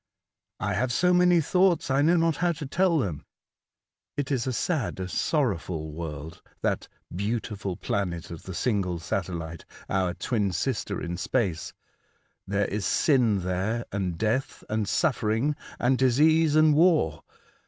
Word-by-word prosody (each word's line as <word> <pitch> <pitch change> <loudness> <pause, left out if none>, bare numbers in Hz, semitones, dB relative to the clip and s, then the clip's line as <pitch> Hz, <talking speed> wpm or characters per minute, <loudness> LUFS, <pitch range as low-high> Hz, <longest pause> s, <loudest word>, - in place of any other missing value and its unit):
" - - -63
'' - - -61
I - - 0
have 125 +3 0
so 180 +7 +3
many 180 -1 +5
thoughts, 180 -2 +2
I 135 +1 +3
know 165 +4 +4
not 165 -2 +2
how 175 -1 +1
to 155 -2 -7
tell 175 +4 +2
them. 90 - -2 0.9
It 145 -1 -2
is 130 -2 0
a - - +1
sad, 135 - -1
a 95 - -3
sorrowful 90 - -1
world, 80 0 -7 0.2
that - - 0 0.3
'beautiful 100 -2 -3
planet 85 -5 -3
of 85 - -7
the 95 - -8
single 95 -7 0
satellite,' 85 -1 -4 0.2
our 95 -2 0
twin 105 -6 -1
sister 105 0 -2
in 85 0 -4
space. 95 -3 -1 0.8
There 100 +1 +1
is 105 +1 -3
sin 115 - +3
there, 95 +6 -1
and 95 -4 -2
death, 115 +6 -1
and 110 -2 -1
suffering, 130 -2 +1 0.2
and 125 +1 +2
disease, 150 +5 +4
and 155 -1 +6
war. 165 +1 +3
110 Hz, 155 wpm, -27 LUFS, 90-150 Hz, 0.9 s, and